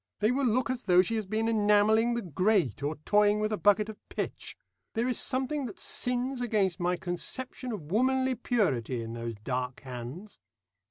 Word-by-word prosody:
They 210 +3 +3
will 265 +1 +1
look 245 +2 +1
as 255 -1 -3
though 180 -2 +6
she 210 - -3
has 215 -3 -2
been 220 +3 0
enamelling 220 +1 +3
the 235 - -2
grate, 180 - +1
or 145 +2 -1
toying 210 0 +4
with 215 0 0
a - - 0
bucket 205 +1 +3
of 220 -1 -9
pitch. - - -5 0.4
There 230 +2 +1
is 250 - 0
something 265 +1 -1
that 205 - -9
sins 250 +1 0
against 205 -6 +1
my 180 0 +1
conception 250 +9 -4
of 170 -8 -7
womanly 260 +4 +2
purity 135 - 0
in 115 0 -6
those 115 -1 -5
dark 125 0 -3
hands." 130 - -8
210 Hz, 180 wpm, -29 LUFS, 175-245 Hz, 0.4 s, though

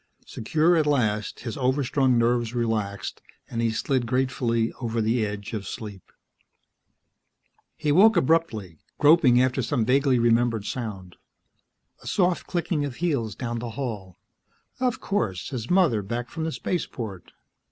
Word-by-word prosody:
Secure 160 +9 +1
at 155 -2 +2
last, 110 -7 0
his 115 -3 -5
overstrung 130 -1 +2
nerves 120 0 +1
relaxed 110 -4 -2 0.3
and 115 -1 -3
he 115 - +2
slid 120 +2 -1
gratefully 120 -2 0
over 115 -1 -2
the 110 +1 +1
edge 105 +1 -5
of 100 -4 -4
sleep. 105 -4 -8 1.7
He 155 -2 0
woke 210 +8 +6
abruptly, 115 - 0 0.2
groping 145 -5 +5
after 130 +1 +2
some 115 -1 0
vaguely 135 +1 +3
remembered 115 -2 +2
sound. 100 -8 -6 0.8
A - - -12
soft 180 -2 +1
clicking 170 -3 -1
of 140 -3 -4
heels 140 - -1
down 120 -1 -4
the 120 0 -5
hall.... 105 -9 -5 0.6
Of 250 -2 0
course, 100 - -2
his 120 -3 -5
mother 175 - +3
back 120 +5 -4
from 160 -1 -3
the 160 - -2
Spaceport! 115 - -4
120 Hz, 140 wpm, -25 LUFS, 110-145 Hz, 1.7 s, woke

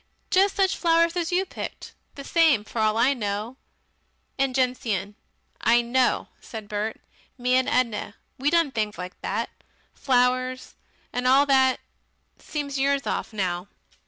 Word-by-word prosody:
Just 390 +1 +4
such 385 -1 +2
flowers 335 0 +2
as 345 -1 -1
you 370 +2 +2
picked. - - -8 0.2
The 280 - -8
same 310 -8 +3
for 225 - -6
all 215 0 +2
I 260 +4 +4
know. 215 +1 -4 0.8
And 270 -2 +1
gentian." 230 -7 -1 0.5
"I 235 +1 +4
know" 250 +2 +1
said 220 -3 -9
Bert, 210 +2 -3 0.4
"me 250 0 0
and 255 0 +3
Edna 230 -4 0 0.2
we 280 +3 +2
done 335 -3 +2
things 215 -3 -2
like 180 0 -8
that. 220 +4 -2 0.4
Flowers. 255 0 +1 0.4
And 250 +1 -1
all 270 +2 +6
that. 265 -2 +3 0.6
Seems 285 -2 -4
years 280 0 +1
off - - -2
now." 185 -3 -2
255 Hz, 145 wpm, -25 LUFS, 220-280 Hz, 0.8 s, all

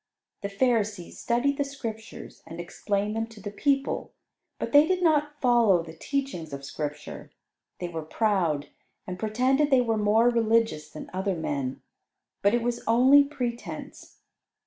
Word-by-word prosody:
The 200 - -3
Pharisees 210 -4 0
studied 255 +4 +1
the 285 - +1
Scriptures 230 -6 -8
and 165 +1 -8
explained 200 +4 -2
them 225 0 -1
to 225 -2 -14
the 205 0 -6
people, 275 +5 0 0.4
but - - -4
they 290 +1 +7
did 370 -1 +1
not 295 -2 +2
follow 235 -8 +4
the 160 -1 -10
teachings 175 - -3
of 140 0 -6
Scripture. 150 +1 -6 0.5
They 175 - -4
were 165 -2 -5
proud, 165 -4 0 0.4
and 180 -1 -6
pretended 255 +7 +2
they 265 -3 +5
were 225 -2 0
more 215 +3 +4
religious 225 -9 +1
than 155 - -10
other 190 +1 -1
men, 140 -5 -3 0.6
but 200 +4 +4
it 240 - 0
was 240 0 -2
only 260 +5 +6
pretense. 245 -4 -6
225 Hz, 150 wpm, -27 LUFS, 175-255 Hz, 0.6 s, they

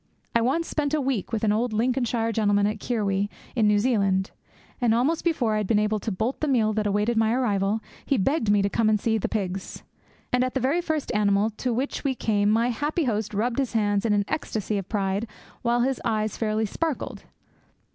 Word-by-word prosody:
I 235 - +3
once 275 +8 +1
spent 300 -1 -1
a - - +1
week 260 -8 -1
with 225 -2 -2
an 215 - +3
old 225 +2 0
Lincolnshire 235 0 0
gentleman 205 -2 +2
at 210 +1 -1
Kirwee, 205 -3 -1 0.3
in 220 -4 +3
New 210 0 +4
Zealand; 200 -4 +1 0.5
and 230 -2 +3
almost 290 +8 +1
before 270 -10 +1
I - - +1
had 210 -2 -1
been 215 - +3
able 210 0 +1
to 215 - -3
bolt 220 +7 -2
the 305 - -1
meal 225 -6 +2
that 210 0 0
awaited 210 +3 +1
my 220 0 +3
arrival, 215 -4 +1 0.2
he 275 - +1
begged 235 +2 +1
me 205 -1 +4
to - - +2
come 220 +1 +2
and 215 -1 +3
see 220 +1 +1
the - - -2
pigs. 195 -3 -4 0.5
And 250 0 +3
at 255 +1 -2
the - - +2
very 275 +8 +1
first 315 -4 -2
animal 210 +1 +2
to 245 +4 -3
which 255 +5 -2
we 270 -2 0
came 205 -3 +1
my 230 +3 +3
happy 295 +7 -1
host 215 -5 -1
rubbed 235 +5 0
his 265 -4 -1
hands 205 -3 +1
in 230 - +1
an 205 -1 +2
ecstasy 215 - -2
of 195 - -8
pride, 200 +1 -1 0.3
whilst 240 0 +2
his 270 -2 -2
eyes 215 -2 -1
fairly 220 0 0
sparkled. 310 +7 -3
220 Hz, 215 wpm, -25 LUFS, 205-250 Hz, 0.5 s, New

